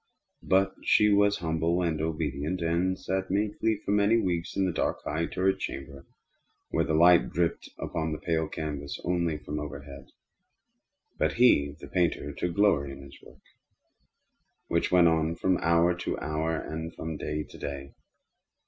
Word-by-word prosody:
But 95 +1 +2
she 105 - +4
was 100 0 +4
humble 85 +2 0
and 80 -3 -1
obedient, 80 +1 -2
and 85 +3 +1
sat 95 0 -3
meekly 105 +2 0
for - - -1
many 105 +2 +4
weeks 85 -4 -2
in 95 - +2
the 90 - 0
dark, - - -2
high 80 +3 -1
turret 95 +1 0
chamber 70 0 -7 0.6
where - - +2
the 80 - 0
light 85 +1 +6
dripped 85 +1 -1
upon 80 -2 -3
the 75 - -2
pale 80 0 -1
canvas 75 -3 -5
only 85 -3 0
from 75 0 -5
overhead. 70 -2 -8 1.1
But - - +1
he, 75 - +4
the - - -10
painter, 85 -5 0
took 85 +4 -3
glory 95 -9 +3
in 70 +1 -11
his 70 0 -14
work, - - -18 1.2
which 85 - 0
went 90 -1 +6
on 80 0 +1
from 95 +1 +1
hour 85 +2 +3
to 85 - -3
hour, 80 +1 -2
and 80 +1 -5
from 80 0 -5
day 75 0 -3
to - - -14
day. 70 -1 -6
80 Hz, 160 wpm, -28 LUFS, 75-90 Hz, 1.2 s, light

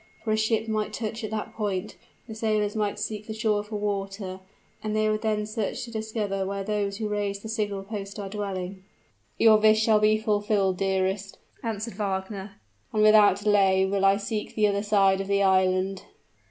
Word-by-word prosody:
For 220 - -1
a - - +3
ship 220 0 +1
might 215 -1 -1
touch 225 +1 -4
at 215 - -3
that 220 +1 -4
point 200 -4 -3 0.3
the 220 - -7
sailors 215 -1 0
might 210 -2 -1
seek 215 -1 -4
the 220 - -5
shore 215 -1 +1
for 210 +1 -7
water, 195 -2 -3 0.4
and 215 0 -2
they 215 0 +2
would 215 0 0
then 215 -1 0
search 215 +3 -3
to 240 - -8
discover 215 -3 -2
where 195 +1 -3
those 200 -1 -1
who 215 -1 -2
raised 205 -1 -2
the - - -6
signal 210 -3 -2
post 200 -1 -6
are 200 -1 -5
dwelling." 190 -2 -5 0.5
"Your 220 -1 +7
wish 215 0 +4
shall 220 -1 +4
be 215 0 +4
fulfilled, 205 -3 +1
dearest," 190 +1 -1 0.2
answered 225 -1 -4
Wagner; 195 0 -3 0.4
"and 215 - +2
without 210 -2 +6
delay 195 -2 +4
will 195 0 0
I 195 0 +5
seek 210 +1 -4
the 215 - +3
other 200 0 0
side 195 -2 +3
of 195 - -5
the 200 0 +2
island." 185 0 +2
210 Hz, 190 wpm, -26 LUFS, 195-215 Hz, 0.5 s, Your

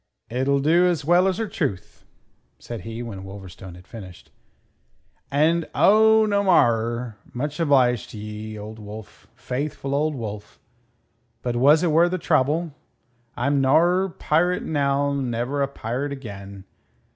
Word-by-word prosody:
"It'll 135 +3 +1
do 170 +5 +4
as 165 -5 -1
well 175 +3 +4
asertruth," 185 - -3 0.5
said 120 -4 -8
he 115 +5 -6
when 100 -5 -7
Wolverstone 95 -2 -10
had 90 0 -15
finished. 95 -7 -12 1.0
"And... 160 +4 +2
oh, 220 +1 +5
no 200 -1 +1
marrer! 120 - +2 0.2
Much 145 +4 -3
obliged 130 -7 +2
to - - -10
ye, 105 +1 -7
Old 110 +2 -8
Wolf 105 0 -11
faithful 135 +3 -4
Old 150 +1 0
Wolf! 105 -4 -7 0.8
But 120 -1 -2
was 145 +7 +5
it 170 - +2
worthertrouble? 160 -2 +2 0.6
I'm 140 0 +1
norrer 175 +8 +3
pirate 175 +4 +1
now; 140 -1 0
never 130 +1 -2
a 140 - +2
pirate 135 +2 -4
again. 100 -7 -9
140 Hz, 125 wpm, -23 LUFS, 110-160 Hz, 1.0 s, oh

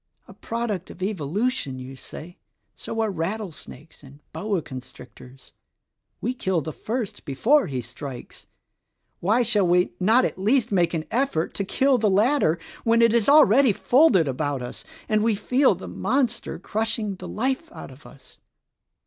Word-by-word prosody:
A - - -13
product 225 -6 -4
of 185 - -8
Evolution, 190 - -2
you 130 +1 -9
say? 165 +6 -11 0.4
So 225 - -4
are 220 -2 0
rattlesnakes 165 -4 -6
and 140 0 -15
boa 200 -6 -2
constrictors. 130 0 -12 0.7
We 245 - -1
kill 190 -8 -1
the 155 +2 -6
first 225 -2 -4
before 250 - +2
he 130 -3 -4
strikes. 125 +2 -9 0.7
Why 220 +7 +2
shall 210 -5 +3
we 180 +1 +2
not 220 +7 +4
at - - -4
least 230 +4 +2
make 175 -3 +2
an 160 -1 -3
effort 235 -10 0
to 200 - -2
kill 260 +6 +2
the 215 -1 +2
latter 205 - +3 0.3
when 230 0 +3
it 230 -1 +4
is 235 +1 +2
already 275 -4 +6
folded 240 - +4
about 135 0 -2
us 125 - -8 0.2
and 215 -1 +2
we 225 0 +2
feel 255 +7 +2
the - - -9
monster 250 -4 -1
crushing 215 +1 -2
the - - -8
life 265 +8 -2
out - - -10
of 135 +3 -16
us?" 135 - -18
200 Hz, 155 wpm, -24 LUFS, 155-235 Hz, 0.7 s, already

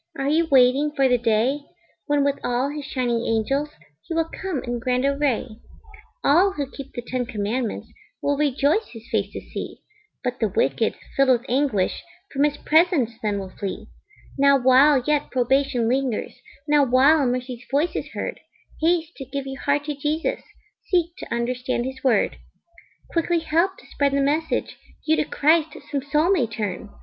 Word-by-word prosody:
Are 275 0 -1
you 325 +2 +2
waiting 265 +2 +5
for 275 -2 +4
the 250 -1 +3
day 235 +5 +1 0.5
When 290 -1 +2
with 280 0 0
all 245 +3 0
his 295 -1 -6
shining 245 -5 -1
angels 270 +7 0 0.3
He 330 - -6
will 330 0 0
come 370 -9 -3
in 240 -1 -3
grand 250 +1 0
array? 275 -5 0 0.7
All 360 +7 +4
who 280 -6 -4
keep 275 -1 -9
the 240 - -5
ten 245 0 -3
commandments 220 +2 -3 0.3
Will 285 - 0
rejoice 290 - +1
his 225 0 -11
face - - 0
to - - -6
see; - - -7 0.5
But 250 0 -2
the 220 - +2
wicked, 190 - +1 0.2
filled 275 -1 +3
with 245 -1 +3
anguish, 255 -7 0 0.3
From 280 +1 +3
his 295 0 -1
presence 315 -7 +3
then 210 -2 -1
will 190 -1 -6
flee 195 -2 -5 0.5
Now 280 0 +6
while 260 +2 +5
yet 295 -1 +1
probation 255 -1 +1
lingers, 255 -2 -1 0.3
Now 295 -1 +4
while 275 +4 +5
mercy's 250 0 -3
voice 290 +5 +1
is - - -3
heard, - - -4 0.4
Haste 330 0 +1
to 270 - -7
give 275 +1 -5
your 270 0 -7
heart 285 0 +1
to 300 - -2
Jesus, 300 +3 -1 0.5
Seek 345 -2 +1
to - - -9
understand 245 +1 -1
his 265 0 -6
Word 240 -6 +2 0.7
Quickly 340 +1 +1
help 335 +4 +1
to - - -17
spread 280 -1 0
the 280 - +2
message, 300 +4 -1 0.3
You 315 - +3
to - - +1
Christ 310 +1 +2
some 280 -2 -1
soul 300 +6 +1
may 300 -12 +2
turn. 210 -2 -4
275 Hz, 175 wpm, -23 LUFS, 245-295 Hz, 0.7 s, Now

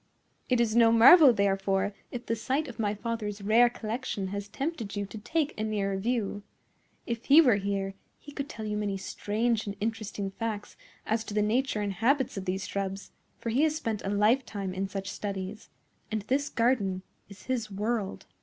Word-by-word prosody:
"It 250 -2 +3
is 230 -2 +2
no 230 -1 +6
marvel, 270 +6 +9
therefore, 195 -1 +1 0.2
if 245 -1 -6
the 230 - 0
sight 265 +7 -1
of 240 -3 -10
my 210 -1 0
father's 210 -2 -4
rare 230 +4 +5
collection 220 -4 -4
has 200 +1 -4
tempted 250 -2 -4
you 205 0 -2
to 210 - -9
take 310 +6 -1
a - - 0
nearer 205 -2 -1
view. 205 0 -1 0.6
If 235 -1 -4
he 285 +3 +8
were 250 -10 +6
here, 195 -1 -2 0.2
he 290 - -12
could 285 0 -5
tell 220 -4 -6
you 210 0 -2
many 205 -2 -1
strange 220 +3 -1
and 200 - -4
interesting 210 -2 -3
facts 215 0 -4 0.3
as 220 +1 0
to 205 - -6
the 210 - +3
nature 225 +1 +1
and 200 -1 -1
habits 255 +6 +1
of 195 -2 -5
these 190 +1 -2
shrubs; 195 0 -4 0.3
for 230 - -4
he 255 +5 +2
has 310 -1 +3
spent 225 -9 -3
a - - -2
lifetime 205 -2 +1
in 190 +1 -2
such 195 0 -5
studies, 195 +1 -5 0.4
and 215 -2 -1
this 275 +6 0
garden 205 -6 +1 0.3
is 200 - -13
his 245 -4 -2
world." 210 0 -2
215 Hz, 190 wpm, -29 LUFS, 200-240 Hz, 0.6 s, marvel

